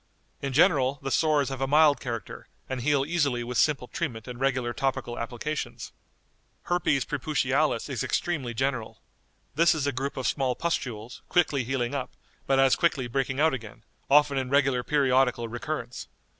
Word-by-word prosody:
In 140 Hz, -, -2 dB
general, 135 Hz, -1 st, +3 dB
the 135 Hz, -, -3 dB
sores 150 Hz, -3 st, +2 dB
have 135 Hz, -1 st, -5 dB
a 135 Hz, -, +1 dB
mild 150 Hz, -1 st, +5 dB
character, 115 Hz, -5 st, -6 dB, 0.2 s
and 130 Hz, -2 st, -4 dB
heal 140 Hz, +1 st, +2 dB
easily 145 Hz, -7 st, 0 dB
with 120 Hz, 0 st, -2 dB
simple 140 Hz, -5 st, +2 dB
treatment 120 Hz, -10 st, -4 dB
and 125 Hz, -1 st, -7 dB
regular 130 Hz, -3 st, 0 dB
topical 135 Hz, -3 st, -2 dB
applications. 125 Hz, +6 st, -4 dB, 0.7 s
Herpes 160 Hz, -7 st, +1 dB
preputialis 145 Hz, -2 st, 0 dB
is 130 Hz, -5 st, -3 dB
extremely 135 Hz, -9 st, -2 dB
general. 130 Hz, -2 st, -2 dB, 0.5 s
This 165 Hz, +3 st, +4 dB
is 150 Hz, -3 st, -1 dB
a 145 Hz, -, +1 dB
group 135 Hz, +2 st, -4 dB
of 130 Hz, -, -3 dB
small 130 Hz, -3 st, 0 dB
pustules, 125 Hz, -7 st, -3 dB
quickly 145 Hz, -6 st, +2 dB
healing 125 Hz, 0 st, -2 dB
up, 130 Hz, -3 st, -4 dB, 0.3 s
but 135 Hz, -, +3 dB
as 135 Hz, -1 st, +5 dB
quickly 150 Hz, -6 st, +1 dB
breaking 135 Hz, +2 st, -2 dB
out 160 Hz, 0 st, +4 dB
again, 115 Hz, -5 st, -7 dB, 0.3 s
often 145 Hz, -1 st, +4 dB
in 130 Hz, -1 st, -3 dB
regular 135 Hz, -2 st, +2 dB
periodical 130 Hz, -4 st, +2 dB
recurrence. 125 Hz, +1 st, -5 dB
135 Hz, 160 wpm, -27 LUFS, 125-145 Hz, 0.7 s, mild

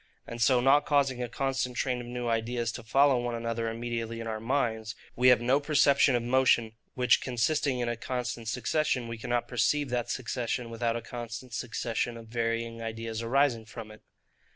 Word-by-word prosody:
And 115 Hz, 0 st, -7 dB
so 125 Hz, +2 st, +4 dB
not 140 Hz, +3 st, +4 dB
causing 135 Hz, -4 st, +2 dB
a 120 Hz, -, -3 dB
constant 130 Hz, -1 st, -2 dB
train 125 Hz, -2 st, 0 dB
of 120 Hz, -, -9 dB
new 120 Hz, 0 st, -4 dB
ideas 115 Hz, 0 st, -1 dB
to -, -, -7 dB
follow 135 Hz, +3 st, +3 dB
one 120 Hz, -1 st, -2 dB
another 115 Hz, 0 st, -2 dB
immediately 115 Hz, 0 st, -4 dB
in 115 Hz, -, -5 dB
our 110 Hz, -1 st, -3 dB
minds, 115 Hz, -2 st, -1 dB, 0.2 s
we 125 Hz, +1 st, +3 dB
have 125 Hz, -1 st, +6 dB
no 130 Hz, +4 st, +3 dB
perception 140 Hz, -2 st, +4 dB
of 120 Hz, -, 0 dB
motion; 120 Hz, -2 st, +3 dB, 0.2 s
which 125 Hz, -2 st, +3 dB
consisting 130 Hz, +2 st, 0 dB
in 120 Hz, -, -1 dB
a 120 Hz, -, -1 dB
constant 125 Hz, -1 st, -4 dB
succession, 125 Hz, +2 st, 0 dB
we 115 Hz, -1 st, -6 dB
cannot 120 Hz, +1 st, -1 dB
perceive 130 Hz, +3 st, +1 dB
that 120 Hz, -1 st, -1 dB
succession 120 Hz, -1 st, -3 dB
without 115 Hz, 0 st, -1 dB
a 120 Hz, -, -4 dB
constant 120 Hz, +1 st, -7 dB
succession 115 Hz, +1 st, -2 dB
of 115 Hz, -1 st, -12 dB
varying 115 Hz, 0 st, -2 dB
ideas 115 Hz, 0 st, -4 dB
arising 120 Hz, -1 st, +2 dB
from 110 Hz, 0 st, -9 dB
it. 110 Hz, -, -14 dB
120 Hz, 185 wpm, -29 LUFS, 115-125 Hz, 0.2 s, have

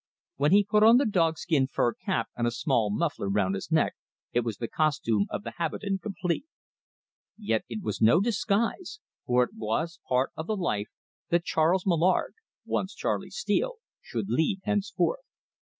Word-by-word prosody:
When 145 Hz, +3 st, +2 dB
he 205 Hz, +1 st, +6 dB
put 210 Hz, +1 st, +2 dB
on 225 Hz, +3 st, +8 dB
the 280 Hz, -, +3 dB
dog 165 Hz, -7 st, +2 dB
skin 145 Hz, -6 st, +1 dB
fur 120 Hz, -3 st, +1 dB
cap 115 Hz, -, -2 dB
and 120 Hz, 0 st, 0 dB
a -, -, +3 dB
small 115 Hz, -2 st, +1 dB
muffler 145 Hz, -3 st, -1 dB
round 100 Hz, -1 st, +1 dB
his 95 Hz, -, -5 dB
neck, -, -, +3 dB, 0.4 s
it 120 Hz, -, +3 dB
was 115 Hz, -4 st, -3 dB
the 115 Hz, -, -3 dB
costume 115 Hz, -10 st, +1 dB
of -, -, -4 dB
the -, -, -5 dB
habitant 190 Hz, +4 st, -2 dB
complete. 190 Hz, -, -3 dB, 0.9 s
Yet 160 Hz, -, -1 dB
it 115 Hz, -2 st, -5 dB
was 105 Hz, -, -3 dB
no 115 Hz, +10 st, +6 dB
disguise, 230 Hz, -, -1 dB, 0.3 s
for 125 Hz, 0 st, +4 dB
it 125 Hz, -, -5 dB
was 115 Hz, +10 st, -2 dB
part 130 Hz, +1 st, +2 dB
of 160 Hz, -, -6 dB
the 215 Hz, -, -1 dB
life 105 Hz, -, -1 dB, 0.4 s
that 170 Hz, 0 st, +2 dB
Charles 170 Hz, +4 st, +2 dB
Mallard, 180 Hz, 0 st, +2 dB, 0.3 s
once -, -, -2 dB
Charley -, -, -2 dB
Steele, -, -, -1 dB, 0.3 s
should -, -, -4 dB
lead 190 Hz, +2 st, +1 dB
henceforth. 210 Hz, -, 0 dB
165 Hz, 170 wpm, -28 LUFS, -, 0.9 s, on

